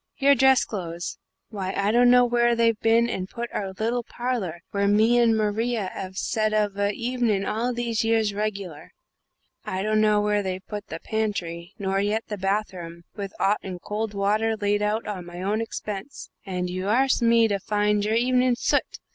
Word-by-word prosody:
Your 280 0 +5
dress 265 0 +4
clothes? 175 -4 -5 0.3
Why, 195 -3 -4
I 200 +1 +2
dunno 245 +1 +6
where 240 0 +2
they've 230 -2 +2
bin 230 +1 +3
and 190 -5 -4
put 235 0 -5
our 195 -2 -3
little 230 +5 -1
parler 235 -9 -3
where 200 0 +1
me 220 +4 +4
and 230 -2 +4
Maria 215 -1 -1
'ave 190 -1 -6
set 215 +2 0
of 210 -2 +1
a 200 0 +1
hevenin' 230 -4 -1
all 230 +4 -1
these 235 -2 -1
years 225 -2 +2
regular. 200 -7 -4 0.7
I 185 +1 -3
dunno 215 0 +3
where 210 0 +1
they've 185 -1 -4
put 210 0 -6
the 165 - -6
pantry, 195 -5 -3
nor 195 -1 -1
yet 210 +3 0
the 210 - -3
bath 195 +2 0
room, 170 -1 -9
with 200 -1 -6
'ot 205 +2 +2
and 185 -2 -6
cold 210 +2 -4
water 215 +3 +1
laid 205 0 0
on 210 +2 0
at 195 -4 -5
my 175 0 -9
own 210 +3 0
expense. 215 +3 -6 0.2
And 180 -1 -2
you 185 +1 -4
arsk 255 +5 +2
me 230 -1 +5
to 200 -2 -1
find 210 +1 +1
your 215 +2 +1
hevenin' 250 +1 +3
soot! - - 0
210 Hz, 185 wpm, -25 LUFS, 195-230 Hz, 0.7 s, dunno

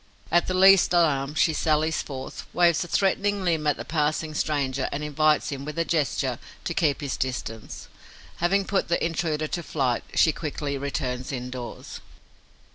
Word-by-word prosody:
At 175 +1 +3
the 185 - -1
least 190 -1 +6
alarm, 150 -4 +2
she 160 - +3
sallies 155 +1 +1
forth, 130 -2 -7
waves 170 -2 +4
a - - -8
threatening 200 +2 +1
limb 160 -4 0
at 145 - +2
the - - -6
passing 155 0 -1
stranger 140 -3 -1
and 145 +2 -3
invites 150 +1 +2
him, 140 -1 -5
with 150 +3 -6
a 165 - +1
gesture, 155 -6 0 0.2
to - - -2
keep 150 -3 +1
his 140 -3 -2
distance. 115 -4 -5 0.5
Having 195 +3 +2
put 195 0 0
the 170 - +1
intruder 160 -2 -1
to 175 - -2
flight, 130 -7 -1
she 160 - +5
quickly 145 -2 -4
returns 135 -2 -3
indoors. 125 -1 -6
155 Hz, 165 wpm, -25 LUFS, 140-170 Hz, 0.5 s, least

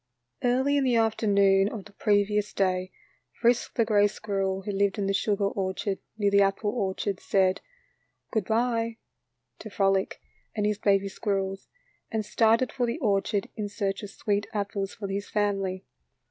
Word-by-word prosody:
Early 260 +4 +2
in 280 - +2
the 250 -2 +2
afternoon 200 -3 +3
of 210 -4 -7
the - - -14
previous 205 0 +1
day, 185 -1 0 0.5
Frisk, 240 0 +2
the 230 - +3
gray 205 -2 +4
squirrel 195 -2 -2
who 205 - -3
lived 200 +1 +1
in 200 - -1
the 195 - 0
sugar 200 0 +1
orchard, 195 0 -2 0.2
near 205 -2 +2
the 200 0 +5
apple 195 +2 +1
orchard, 200 -3 -2
said 190 -1 +1 0.7
"good 220 -5 0
by" 230 0 0 0.6
to 215 - -8
Frolic 195 -1 +1 0.4
and 210 -1 0
his 210 -1 0
baby 200 -1 +2
squirrels, 195 -1 -2 0.4
and 220 -1 -1
started 225 +3 +3
for 245 -3 -1
the 235 - -2
orchard 200 -6 0
in 210 -2 -3
search 200 -2 -2
of 205 - -7
sweet 205 +1 -1
apples 200 -1 -2
for 205 - -5
his 200 +1 -4
family. 195 -3 -1
205 Hz, 160 wpm, -27 LUFS, 195-220 Hz, 0.7 s, the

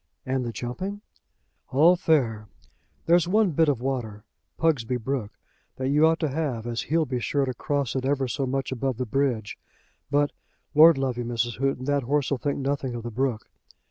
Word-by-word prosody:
"And 130 0 -1
the 120 - -3
jumping?" 185 - -5 0.7
"All 160 +7 +5
fair. 120 -11 +1 0.6
There's 170 +1 +4
one 205 0 +3
bit 160 0 +3
of 135 -5 0
water, 120 -6 -3 0.3
Pugsby 130 -7 +1
Brook, 125 -3 -4 0.4
that 130 0 -2
you 150 +3 +5
ought 160 0 +2
to 155 - +1
have 135 -7 -2
as 120 -1 -2
he'll 160 +1 +1
be 125 -2 -2
sure 140 +3 0
to 130 - -3
cross 140 0 -2
it 130 - -1
ever 135 -1 0
so 135 +2 -2
much 135 0 -2
above 130 -1 -2
the 125 - -2
bridge. 120 -3 -1 0.5
But, 145 0 +2 0.4
lord 155 +1 +8
love 130 -2 -1
you, - - -1
Mrs. 120 0 -2
Houghton, 135 -1 -1
that 145 0 +1
horse'll 140 +1 0
think 145 +2 -1
nothing 135 -2 -2
of 120 - -6
the 120 - -5
brook." 120 -1 -1
135 Hz, 185 wpm, -25 LUFS, 120-145 Hz, 0.7 s, lord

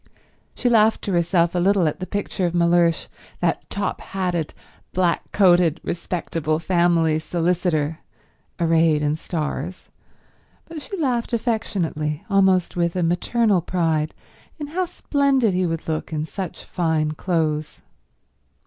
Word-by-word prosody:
She 250 - -1
laughed 220 -2 +4
to 200 - -2
herself 170 -1 +2
a 180 - 0
little 190 -1 +3
at 150 - -2
the 185 - -5
picture 200 -2 -2
of 170 - -3
Mellersh, 170 -1 +3 0.3
that 165 -3 -1
top 200 0 -3
hatted, 180 -5 -2 0.4
black 175 -2 0
coated, 175 -4 +4
respectable 165 -2 -2
family 170 -2 +2
solicitor, 165 -2 0 0.6
arrayed 165 -2 +3
in 150 +1 +1
stars, 160 +1 -4 0.8
but 330 -2 -8
she 395 - -6
laughed 250 -7 -1
affectionately, 190 - -1
almost 190 -2 +3
with 170 0 0
a 180 - 0
maternal 190 +4 +2
pride 160 -3 0 0.4
in 300 - -5
how 355 +6 -1
splendid 275 - +1
he 180 0 +1
would 165 -1 -4
look 155 0 -3
in 155 -1 -2
such 185 +2 -6
fine 160 -3 0
clothes. 155 -2 -2
175 Hz, 130 wpm, -22 LUFS, 160-195 Hz, 0.8 s, laughed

